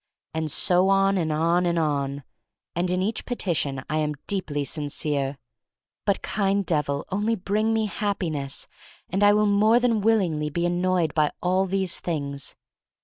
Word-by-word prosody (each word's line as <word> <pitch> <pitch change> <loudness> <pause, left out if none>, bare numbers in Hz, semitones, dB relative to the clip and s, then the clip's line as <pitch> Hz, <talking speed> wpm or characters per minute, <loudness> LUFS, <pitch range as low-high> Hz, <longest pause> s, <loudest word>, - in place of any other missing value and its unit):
And 160 -1 -2
so 180 +5 +3
on 195 0 +4
and 160 -2 0
on 170 +3 +2
and 170 0 +1
on. 140 -3 -1 0.5
And 175 +2 0
in 180 +1 +1
each 215 +4 -2
petition 155 - -1
I 155 0 0
am 150 -1 -1
deeply 155 -8 -2
sincere. 145 -2 -2 0.7
But, 200 - +1
kind 200 -1 0
Devil, 150 -4 0
only 210 +4 +1
bring 210 +3 0
me 220 -1 +1
Happi 200 -4 -2
ness 140 -2 -4 0.4
and 190 +3 0
I 205 0 +7
will 210 0 +3
more 210 +3 +4
than 235 -3 +2
willingly 180 -9 +2
be 170 +3 -1
annoyed 175 -1 +1
by 155 -2 +3
all 185 +2 +2
these 190 -1 -1
things. 140 -5 -4
175 Hz, 160 wpm, -25 LUFS, 150-200 Hz, 0.7 s, I